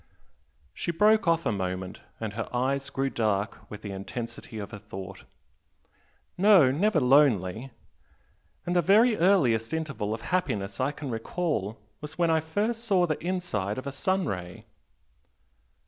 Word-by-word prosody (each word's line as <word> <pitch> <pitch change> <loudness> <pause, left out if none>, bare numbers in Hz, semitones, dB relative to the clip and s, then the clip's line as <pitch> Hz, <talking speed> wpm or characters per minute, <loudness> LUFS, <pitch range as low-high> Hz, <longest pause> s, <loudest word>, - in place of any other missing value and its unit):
She - - -5
broke 210 +4 +3
off 165 0 +2
a - - +2
moment, 95 -2 -4 0.2
and 110 -3 -4
her 110 +1 -4
eyes 135 +3 -1
grew 135 -1 -1
dark 105 -2 -1
with 105 0 -9
the 100 - -5
intensity 115 +4 -7
of 100 -2 -6
her 105 - -8
thought 95 0 -9 1.1
"No 190 -9 +6
never 200 +10 +2
lonely! 125 -4 +3 1.0
And 175 - -1
the 175 - +5
very 215 +7 +5
earliest 160 - +2
'interval' 115 -10 -3
of 115 - -11
happiness 105 - -2
I 130 +2 +1
can 145 -3 -6
recall 115 - -2 0.2
was 150 0 -8
when 170 -2 +2
I 160 - +3
first 210 +9 -2
saw 195 -6 +3
the 155 -2 -3
inside 170 - -2
of 130 - -5
a 140 - -3
sun 185 +6 0
ray!" 90 - -5
135 Hz, 150 wpm, -27 LUFS, 105-175 Hz, 1.1 s, No